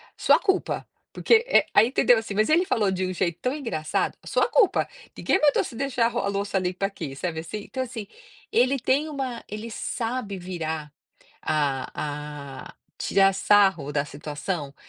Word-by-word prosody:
"Sua - - +5
culpa, 385 -2 0 0.3
porque", 460 -1 +4
eh, - - +5
aí 220 +3 +6
entendeu 245 -2 +4
assim, 220 -2 -6
mas 215 +5 +2
ele 340 +4 +4
falou 210 - +1
de 185 0 -1
um 185 - -3
jeito 170 -2 -1
tão 255 +2 0
engraçado: 230 - -2
"A - - -15
sua - - +2
culpa, 450 -6 +3 0.3
ninguém 380 - +2
voltou 290 -2 +4
a - - -2
se 235 - -8
deixar 255 -2 0
a - - -1
ro - - -2
a 200 - -1
louça 200 0 -1
limpa 185 +1 -1
aqui". 160 -9 -5
Sabe 160 +2 -3
assim? 205 +6 -6
Então 260 - -5
assim, 230 -4 -6 0.5
ele 260 +3 +3
tem 275 +5 +1
uma 265 -5 -4
ele 215 +3 -6
sabe 225 -2 -3
virar 160 -4 -4 0.5
a 145 0 -3
a - - -13 0.2
tirar 195 0 +3
sarro 190 -8 +3
da 145 0 0
situação, 145 +1 -5
200 Hz, 180 wpm, -25 LUFS, 160-245 Hz, 0.5 s, aí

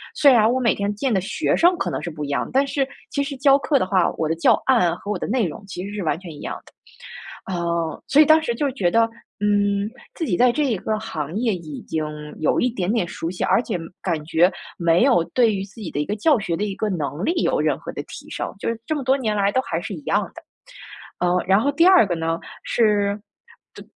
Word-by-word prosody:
虽 285 -2 +6
然 225 -3 +5
我 255 - +1
每 235 -3 +3
天 200 +1 -2
见 250 +4 -1
的 195 - +3
学 260 - -1
生 350 +2 +4
可 - - -2
能 - - -3
是 170 - -4
不 150 -1 -6
一 - - -4
样， 140 - -1
但 270 +2 +3
是 275 -1 -1 0.2
其 280 - 0
实 280 0 -5
教 275 +1 +5
课 285 0 +1
的 185 - +1
话， 185 -2 +3
我 160 -1 -1
的 160 - +1
教 165 - +3
案 180 -11 +3
和 205 - -6
我 210 - -1
的 - - -3
内 235 0 +1
容 155 - -8
其 185 -2 -6
实 205 - -7
是 205 - -3
完 160 - 0
全 180 -3 -9
一 150 - -11
样 - - -4
的。 - - -19 0.8
呃， 170 -2 -2
所 290 +3 +6
以 - - +6
当 315 +2 +6
时 240 - -1
就 280 +4 -1
觉 185 -9 0
得， 230 +2 +3 0.3
嗯， 205 0 +1 0.2
自 330 - -3
己 180 - 0
在 250 0 +5
这 300 +5 0
一 235 -6 0
个 215 +3 -2
行 160 -9 -5
业 225 -2 +1
已 155 -5 -8
经 155 -1 -3 0.3
有 155 - +1
一 250 - +2
点 195 -5 -2
点 225 -6 0
熟 165 -1 -5
悉， 180 - -8
而 - - +3
且 215 -7 -3 0.2
感 165 -5 -2
觉 170 +3 +3 0.3
没 170 0 +3
有 170 -2 +4
对 230 -4 +3
于 190 - -3
自 195 - -13
己 185 - -5
的 145 - -4
一 - - -2
个 205 - -2
教 275 +6 +3
学 175 -5 -2
的 210 - -1
一 200 -2 -4
个 215 - -2
能 155 -2 -3
力 - - +2
有 - - +1
任 - - 0
何 - - -9
的 - - -5
提 - - -11
升， - - -4
就 - - -4
是 230 -1 -3
这 - - -1
么 290 - -3
多 260 +2 +3
年 220 -6 -1
来 200 -1 +2
都 260 - +1
还 165 -9 -3
是 200 +4 -6
一 165 - -7
样 205 +8 +1
的。 340 - -10 0.8
呃， 180 0 +2
然 195 +2 +5
后 285 +5 +1
第 335 +4 +3
二 370 - +7
个 185 - -2
呢， 165 0 -2 0.2
是 205 -3 +1 0.5
对 - - -11
205 Hz, 285 characters per minute, -22 LUFS, 175-250 Hz, 0.8 s, 二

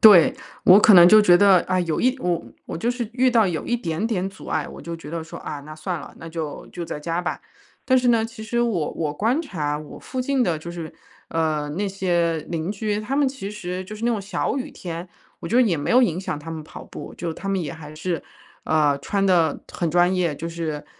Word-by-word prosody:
对， 215 +4 +8 0.3
我 185 +3 +8
可 215 - +7
能 175 -1 +10
就 215 +2 +8
觉 175 -3 +7
得， 195 -2 +6
啊， 185 - +2
有 165 -3 -1
一 255 +2 +2
我 175 -6 -1 0.2
我 - - -5
就 230 +9 0
是 245 -2 -3
遇 255 +1 +3
到 230 -3 +4
有 165 -4 -2
一 240 - 0
点 170 -4 -3
点 195 -5 0
阻 195 - -13
碍， 155 -2 -1
我 - - -10
就 170 0 -5
觉 165 -3 -11
得 165 -1 -3
说， 160 - -9
啊， 145 - -6
那 155 +2 -10
算 175 +1 -3
了， - - -10
那 165 - -8
就 160 -3 -5
就 175 - -6
在 150 - -5
家 165 +3 -2
吧。 175 - -3 0.4
但 260 0 +4
是 250 -1 +3
呢， 230 -2 +4
其 225 -1 -8
实 235 +2 -1
我 205 -10 0
我 155 -3 -2
观 230 - +1
察 150 - -3
我 150 -1 -10
附 260 - -4
近 265 0 +1
的 170 -8 0
就 170 +2 -7
是， 165 -2 -7 0.4
呃， 155 -2 0
那 195 +7 -2
些 175 -4 0
邻 165 +1 -2
居， 210 0 -2
他 225 +6 -3
们 285 -1 +3
其 260 -7 -6
实 185 -3 -5
就 210 +3 -8
是 215 +2 -6
那 240 - +3
种 220 - 0
小 200 +6 -2
雨 275 +3 -5
天， 175 -3 -6 0.3
我 - - -6
觉 - - -2
得 255 - +7
也 195 -8 +2
没 145 - -2
有 250 +2 +6
影 180 -6 +1
响 185 - -3
他 150 +2 -9
们 160 -1 -5
跑 - - -10
步， - - -9
就 170 -2 -3
他 195 +4 -7
们 195 -2 +1
也 145 - -4
还 155 -2 -10
是， 165 0 -2 0.4
呃， 150 -3 +2
穿 195 +7 -1
得 170 -5 +2
很 170 - -1
专 175 +2 +4
业。 175 -4 +1
就 165 +4 -5
是， 160 -3 -4
180 Hz, 270 characters per minute, -23 LUFS, 160-215 Hz, 0.4 s, 能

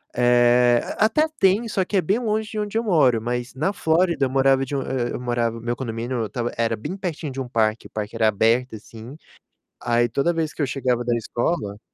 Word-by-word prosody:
eh, 120 0 +4 0.2
a 215 - +4
até 300 +8 +2
tem 195 +5 +3
só 195 -3 -1
que 200 - -1
é 185 - +3
bem 200 +8 0
longe 215 -2 -1
de 215 - -4
onde 210 +1 -2
eu 230 - 0
moro, 145 - +3
mas 120 +1 -3
na 155 +8 0
Flórida 165 -4 +1
eu - - -2
morava 135 0 +3
de 140 - -5
u 135 - -1
e 125 -2 -2
eu - - -4
morava 120 -2 -1
meu 120 +1 -2
condomínio 120 0 -4
eu - - -1
estava 120 +3 -3
era 115 -1 +1
bem 145 - -6
pertinho 165 -6 -4
de 135 - -6
um 130 - -5
parque, 110 -1 0
parque 105 +1 -5
era 110 -1 +2
aberto 115 +4 +1
assim, 115 +5 -11 0.7
aí 120 0 +1
toda 140 +9 0
vez 160 -2 -2
que - - -5
eu 140 - +1
chegava 125 -2 -1
da 120 -1 +1
escola 115 -2 -2
125 Hz, 225 wpm, -22 LUFS, 120-170 Hz, 0.7 s, eh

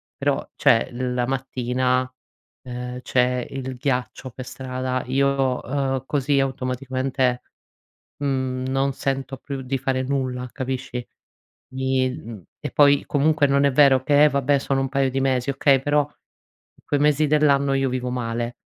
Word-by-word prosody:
però - - -1
cioè 115 - +3
l 125 0 -3
la 125 -1 +1
mattina, 125 0 0 0.6
ehm, 125 0 -6
c'è 125 -1 +1
il 130 -1 -5
ghiaccio 125 0 -2
per 130 +1 -9
strada 130 0 -3
io, 135 -1 +1
uhm, 135 0 -1
così 140 0 +1
automaticamente, 130 -1 -1 0.8
mhmm, 130 -2 -1
non 135 +1 +1
sento 135 0 -3
più 135 0 -6
di 130 +1 -2
fare 130 0 -1
nulla 130 -2 -2
capisci? 130 -2 -4 0.7
Mi 130 0 +1
mhmm, 115 - -8 0.2
e - - -4
poi 145 -1 +5
comunque 150 +1 +2
non 140 0 +3
è 140 - +4
vero 135 -1 +5
che: 145 +1 +5
"Eh, - - +7
va 140 0 0
beh 140 +2 +3
sono 135 0 0
un 135 - -1
paio 135 0 +1
di 135 +1 -1
mesi." 130 0 +1
Okay, 135 0 +3
però 145 +1 +3
in 145 - -28
quei 145 - +1
mesi 150 +1 +3
dell'anno 140 -2 +3
io 135 0 +1
vivo 125 0 -2
male, 120 -1 -3
130 Hz, 155 wpm, -23 LUFS, 125-140 Hz, 0.8 s, Eh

